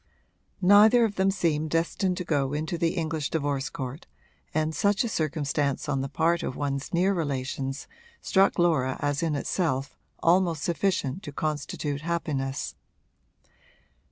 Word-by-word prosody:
Neither 215 +5 +7
of 215 - -2
them 190 0 +2
seemed 160 -5 0
destined 170 +3 0
to 180 - -2
go 145 -5 0
into 160 +4 -2
the 170 0 0
English 160 -3 -2
divorce 145 -3 -1
court, 135 +3 -6 0.4
and 155 0 0
such 200 +7 +2
a - - -1
circumstance 150 - -1
on 135 -1 0
the 135 - -3
part 165 +4 +1
of 130 - -4
one's 140 -1 -3
near 185 +3 +2
relations 135 -4 -3 0.3
struck 195 0 +3
Laura 155 -7 +2
as 145 -1 0
in 160 -3 0
itself 140 -2 -1 0.3
almost 170 -3 +3
sufficient 170 -2 0
to 145 - -7
constitute 145 -1 -3
happiness. 150 -5 -2
155 Hz, 140 wpm, -27 LUFS, 140-175 Hz, 0.4 s, Neither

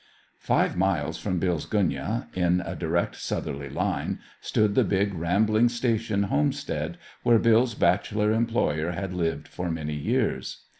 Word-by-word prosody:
Five - - +1
miles - - 0
from 90 - -2
Bill's 85 -3 -1
gunyah, 95 - 0
in 90 0 +2
a - - -5
direct 85 0 -1
southerly 70 -2 -4
line, - - -1 0.2
stood 105 -1 +1
the - - +4
big, 100 0 +1
rambling 105 +7 +2
station 115 -4 0
homestead, 145 - -1 0.2
where 120 -1 +5
Bill's 115 +1 +3
bachelor 105 +3 +2
employer 110 -8 0
had 95 +1 -4
lived 85 -2 -2
for 90 0 -4
many 80 -2 -3
years. 75 -1 -1
100 Hz, 140 wpm, -26 LUFS, 85-110 Hz, 0.2 s, where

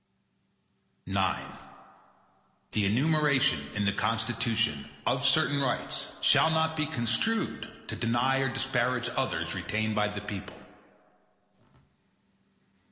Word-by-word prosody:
IX - - -5 1.6
The 105 -2 +1
enumeration 140 - +3 0.2
in 105 -1 0
the 100 - +3
Constitution, 115 - -1 0.2
of - - +1
certain 145 -1 +3
rights, 130 -3 -1
shall 160 - +5
not 160 0 +1
be 155 -1 0
construed 155 - -1 0.2
to - - -4
deny 120 +4 +1
or 135 0 +1
disparage 125 -2 0
others - - -1
retained 110 +2 -1
by 105 0 +2
the 105 -1 -5
people. 105 -2 -7
120 Hz, 100 wpm, -29 LUFS, 110-140 Hz, 1.6 s, shall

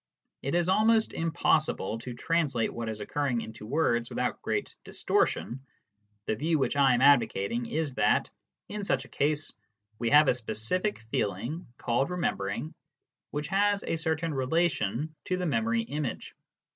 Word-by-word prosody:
It 140 +5 -1
is 175 0 +2
almost 220 +3 +3
impossible 155 - +1
to 120 +1 -7
translate 140 -5 0
what 115 -1 -4
is 110 -1 -4
occurring 130 +1 -1
into 110 -1 -9
words 120 -4 +1
without - - -2
great - - -2
distortion. 120 - 0 0.7
The - - 0
view 155 +7 +1
which 140 - 0
I 135 -3 +5
am 120 - 0
advocating 120 -4 +3
is 155 -3 -2
that, - - +2 0.4
in 210 0 -5
such 135 -8 0
a - - -16
case, 150 +2 0 0.5
we 115 - 0
have 150 +3 +7
a - - +5
specific 125 - -1
feeling, 120 - -2
called 125 +5 0
remembering, 155 - -2 0.6
which 150 +1 -4
has 205 +1 +2
a - - -1
certain 160 0 -1
relation 145 - 0
to 185 - 0
the 180 - -2
memory 230 +7 +1
image. 150 - -4
145 Hz, 150 wpm, -29 LUFS, 120-170 Hz, 0.7 s, have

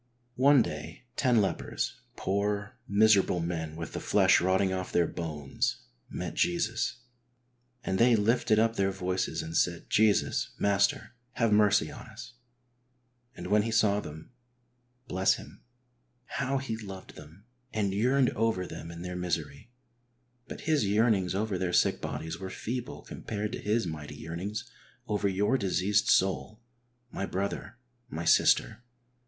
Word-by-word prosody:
One 135 -1 +6
day 75 +8 -7
ten 125 -5 +3
lepers, 95 - -2 0.2
poor, 100 +2 -1
miserable 100 -3 +4
men 80 -2 -3
with 85 -1 -6
the - - -3
flesh - - +4
rotting 95 +1 +2
off 95 -1 -4
their 85 - +3
bones, 75 -5 -3 0.3
met 90 - -5
Jesus, 170 -7 0 0.8
"and 95 -4 -1
they 120 0 +6
lifted 110 0 +2
up 115 +1 +2
their 95 0 +2
voices 95 -3 -2
and 80 +1 -6
said, 85 -1 0
Jesus, 110 -1 +2
Master, 100 +3 +1 0.2
have 115 -3 +2
mercy 105 -6 +4
on - - -10
us. - - -11 1.0
And - - -8
when 105 0 +3
He 115 - -2
saw 110 -3 +3
them 80 +1 -9 0.3
" 120 0 -43
— 125 +1 -43
(bless 95 -1 +2
Him - - -12 0.2
!) 125 -1 -43
— 125 0 -43
how 135 0 0
He 130 -4 -3
loved 95 -4 -9
them 80 +7 -14 0.3
and 100 -3 -1
yearned 125 +5 +3
over 110 -5 0
them 85 - -8
in 85 +1 -8
their 90 0 -5
misery! 90 +4 -3 0.8
But - - -8
His 155 -5 +2
yearnings 100 -4 +2
over 100 -2 -1
their 90 -1 -1
sick - - +3
bodies 80 +1 -5
were 95 0 -5
feeble 120 +5 -5
compared 105 -1 -5
to - - -5
His 105 0 +1
mighty 75 -3 -6
yearnings 85 +8 -5 0.4
over 105 -1 0
your 105 +7 +1
diseased 100 +1 +1
soul, 95 +3 +2 0.5
my 100 - -3
brother, 100 +4 -4 0.3
my 85 -3 -5
sister. 110 +6 +4
100 Hz, 150 wpm, -29 LUFS, 90-115 Hz, 1.0 s, One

